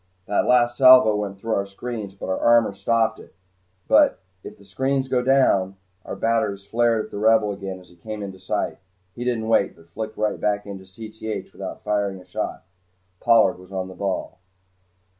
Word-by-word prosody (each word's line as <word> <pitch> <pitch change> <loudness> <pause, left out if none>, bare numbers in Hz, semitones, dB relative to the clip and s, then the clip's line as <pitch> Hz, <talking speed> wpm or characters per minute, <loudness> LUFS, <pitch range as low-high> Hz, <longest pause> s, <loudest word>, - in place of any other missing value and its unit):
That 105 - 0
last 120 -1 +3
salvo 130 -5 +8
went 100 -2 -3
through 110 +3 -3
our 100 -1 -1
screens, 105 -1 -6
but - - -7
our 95 - -1
armor 115 -3 +4
stopped 115 +2 0
it. - - -16 0.5
But - - +5 0.3
if 105 - -10
the 100 - -19
screens 130 +6 -1
go 125 -1 +1
down 125 -8 +2 0.2
" 90 0 -42
Our - - -5
batteries 110 -4 -1
flared 115 +1 +1
at - - -16
the 100 - -5
Rebel 110 -1 +3
as 100 - -11
he 100 - -7
again 90 -2 -9
came 105 +4 -7
into 95 -1 -8
sight. 100 +2 -3 0.3
He 120 - -6
didn't 120 -3 -1
wait, 110 -3 +2
but 85 0 -21
flicked 110 +3 -6
right 105 0 -1
back 105 0 0
into 95 -2 -8
Cth 110 +3 -7
without - - -8
firing 100 -2 -1
a 90 - -16
shot. - - -5 0.6
Pollard 115 -5 +4
was 90 +1 -15
on 95 -1 -4
the - - -9
ball. 95 -1 -4
105 Hz, 195 wpm, -23 LUFS, 95-115 Hz, 0.6 s, salvo